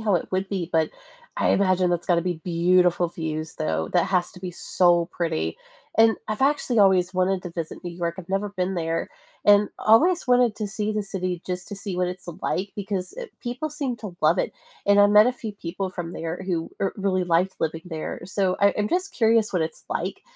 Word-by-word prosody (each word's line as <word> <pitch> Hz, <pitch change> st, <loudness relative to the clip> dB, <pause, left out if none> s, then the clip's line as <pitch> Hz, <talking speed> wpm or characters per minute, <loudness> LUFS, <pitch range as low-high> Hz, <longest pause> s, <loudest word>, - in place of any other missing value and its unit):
how 210 Hz, -3 st, +1 dB
it 175 Hz, -, -1 dB
would 190 Hz, +1 st, 0 dB
be, 180 Hz, -4 st, -3 dB
but 160 Hz, -1 st, +2 dB, 0.5 s
I -, -, +1 dB
imagine 185 Hz, -2 st, +3 dB
that's 175 Hz, -1 st, -1 dB
gotta 175 Hz, -2 st, +3 dB
be 175 Hz, -3 st, -3 dB
beautiful 175 Hz, 0 st, +3 dB
views, 160 Hz, -2 st, -4 dB
though. 80 Hz, 0 st, -1 dB
That -, -, +4 dB
has 180 Hz, -2 st, +1 dB
to 180 Hz, -, -13 dB
be 185 Hz, -, -4 dB
so 175 Hz, -1 st, +2 dB
pretty, 165 Hz, -, -2 dB, 0.4 s
and 225 Hz, 0 st, +5 dB
I've 215 Hz, +4 st, -2 dB
actually 270 Hz, -4 st, +2 dB
always 185 Hz, -2 st, +4 dB
wanted 185 Hz, 0 st, +1 dB
to 175 Hz, -, -6 dB
visit 165 Hz, 0 st, -6 dB
New 175 Hz, -, -4 dB
York. 170 Hz, -1 st, -3 dB
I've 175 Hz, -, -9 dB
never 195 Hz, +1 st, -1 dB
been 185 Hz, -1 st, -2 dB
there 165 Hz, -1 st, -2 dB, 0.4 s
and 205 Hz, 0 st, +6 dB
always 335 Hz, +10 st, +4 dB
wanted 245 Hz, -3 st, +4 dB
to 215 Hz, -, -2 dB
see 215 Hz, +1 st, -2 dB
the 210 Hz, -1 st, -1 dB
city 185 Hz, -3 st, -3 dB
just 180 Hz, -1 st, -4 dB
to 205 Hz, -, -5 dB
see 195 Hz, -2 st, -5 dB
what 180 Hz, 0 st, +1 dB
it's 180 Hz, -1 st, -8 dB
like 195 Hz, +2 st, -1 dB
because, 195 Hz, -2 st, -3 dB
eh, 485 Hz, -, -5 dB, 0.2 s
people 250 Hz, +5 st, -3 dB
seem 280 Hz, -5 st, -3 dB
to 205 Hz, -6 st, -8 dB
love 160 Hz, +4 st, +4 dB
it, -, -, 0 dB, 0.3 s
and 200 Hz, 0 st, +5 dB
I 205 Hz, -, +8 dB
met 210 Hz, +2 st, +7 dB
a 250 Hz, -, +2 dB
few 225 Hz, -4 st, -6 dB
people 190 Hz, 0 st, -5 dB
from 175 Hz, -2 st, -6 dB
there 165 Hz, +3 st, -4 dB
who, 170 Hz, -3 st, -2 dB
er, 195 Hz, -, 0 dB
really 190 Hz, -2 st, 0 dB
liked 175 Hz, +2 st, +1 dB
living 160 Hz, 0 st, -2 dB
there. 160 Hz, -3 st, -5 dB
So 190 Hz, 0 st, 0 dB
I 200 Hz, 0 st, +4 dB
I'm 210 Hz, 0 st, +1 dB
just 370 Hz, +2 st, -1 dB
curious 225 Hz, -2 st, +3 dB
what 175 Hz, -3 st, +1 dB
it's 160 Hz, -, -5 dB
like -, -, -3 dB
185 Hz, 220 wpm, -24 LUFS, 175-210 Hz, 0.5 s, I